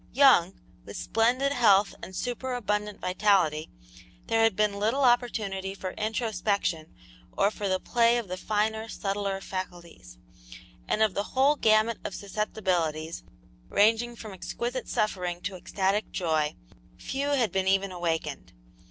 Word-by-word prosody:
Young, 250 -10 +5 0.2
with 100 +2 -9
splendid 245 +5 +1
health 210 -6 +4
and 190 - -9
superabundant 220 -4 -2
vitality, 180 -5 +2 0.6
there 225 0 +2
had 225 -3 +4
been 210 -1 +1
little 230 +7 +1
opportunity 210 -6 +1
for 185 -1 -5
introspection 205 -7 -2 0.4
or 200 +1 +2
for 205 -2 -3
the 185 0 +1
play 235 +3 +3
of 235 -4 -3
the 185 - -4
finer, 220 +3 -1
subtler 195 -1 -2
faculties; 175 - -7 0.7
and 215 - +2
of 215 -3 +2
the 200 +6 -4
whole 280 +3 +5
gamut 220 -2 +3
of 195 - -5
susceptibilities, 180 -6 -2 0.5
ranging 230 +3 +3
from 215 -3 -9
exquisite 240 +6 -4
suffering 180 -4 -1
to 185 +1 -4
ecstatic 195 +3 -1
joy, 155 -4 0 0.4
few 270 - -3
had 240 -8 +2
been 190 0 0
even 195 0 +2
awakened. 170 -2 -3
205 Hz, 135 wpm, -27 LUFS, 185-225 Hz, 0.7 s, Young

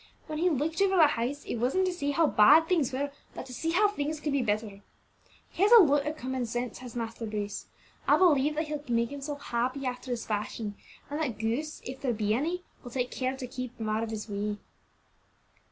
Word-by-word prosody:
"When 310 -1 -4
he 360 +2 +3
looked 320 +4 -1
over 390 -1 +4
the 330 -4 +8
house, 280 +1 -1
it - - -3
wasn't 265 +12 +2
to 370 - 0
say 285 -5 -2
how 325 +3 +3
bad 300 +6 +6
things 320 -7 +2
were, 280 +2 -2 0.2
but - - -6
to 255 - -10
see 325 +6 -2
how 390 +5 +4
things 310 -6 -3
could 300 -1 -2
be 280 - +2
bettered. 210 -3 -2 0.7
He - - -5
has 410 +3 +5
a 480 - +11
lot 290 -2 +2
o' 300 - -1
common 260 -4 -3
sense, 240 0 -3
has 250 -2 -9
Master 230 -1 -4
Bruce; 205 -1 -4 0.4
I - - +6
believe 300 -5 +4
that 315 +1 -1
he'll 300 -1 -4
make 235 0 +1
himself 285 +1 -5
happy 255 +2 -2
after 250 0 -4
his 240 -2 -2
fashion, 210 0 -3 0.4
and 295 +2 -2
that 250 -9 -2
ghosts, 235 +8 -2
if 260 +2 -7
there 255 -3 0
be 210 -1 0
any, 335 +9 -1 0.2
will 245 - -8
take 250 0 -2
care 260 0 -2
to 265 - -5
keep 255 -1 -7
out 215 0 -1
of 225 - -3
his 220 -1 -5
way." 205 0 -2
260 Hz, 220 wpm, -29 LUFS, 230-305 Hz, 0.7 s, a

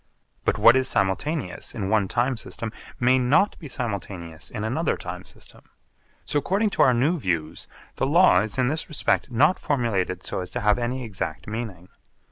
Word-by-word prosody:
But - - +2
what 115 - +7
is 130 0 +3
simultaneous 125 - -1
in 100 -5 -2
one 105 -1 +2
time 125 +5 0
system 115 -1 -6 0.3
may 125 +2 +4
not 140 +11 +3
be 155 - -8
simultaneous 95 - -5
in 105 - -5
another 145 +9 0
time - - -7
system. - - -11 0.6
So 145 - +1
according 200 +7 0
to - - 0
our - - +6
new 150 +8 +2
views 85 - -2 0.3
the 130 - +1
law 165 - +5
is 110 +4 -3
in 130 - +3
this 155 +5 -2
respect 150 -2 0
not 145 +9 +3
formulated 100 -9 -1
so - - -3
as 90 -1 -4
to - - -2
have 105 +3 +3
any 125 +2 -2
exact 105 -6 -5
meaning. 105 -6 -6
120 Hz, 180 wpm, -24 LUFS, 100-140 Hz, 0.6 s, what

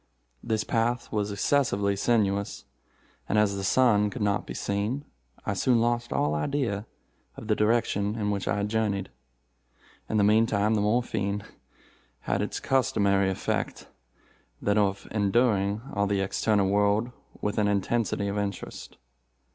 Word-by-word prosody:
This 110 -1 -1
path 120 +1 -1
was 105 -1 -1
excessively 100 -3 +1
sinuous, 100 -2 0 0.6
and 105 - +2
as 105 -2 +3
the 100 - -4
sun 105 -1 +3
could 120 -1 -4
not 100 -1 0
be - - -6
seen, 105 +8 -2 0.4
I - - 0
soon 125 -2 +2
lost 120 +1 0
all 75 +1 +1
idea 105 - -1 0.5
of 110 - -8
the 105 - +2
direction 105 -2 +1
in 105 -2 -1
which 100 -2 -3
I 100 - 0
journeyed. 105 -2 -1 1.0
In 110 - 0
the 105 - +4
meantime 110 0 +3
the 105 - +2
morphine 105 -2 0 0.8
had 100 - -1
its 105 - -3
customary 100 -7 +2
effect—that - - -5
of 100 -2 +1
enduing 105 -1 +2
all 100 0 +1
the 100 -1 0
external 100 +1 +1
world 105 +4 +2 0.3
with 105 +1 -1
an 105 - +2
intensity 100 +1 0
of 100 +1 -1
interest. 100 -2 -5
105 Hz, 140 wpm, -27 LUFS, 100-115 Hz, 1.0 s, the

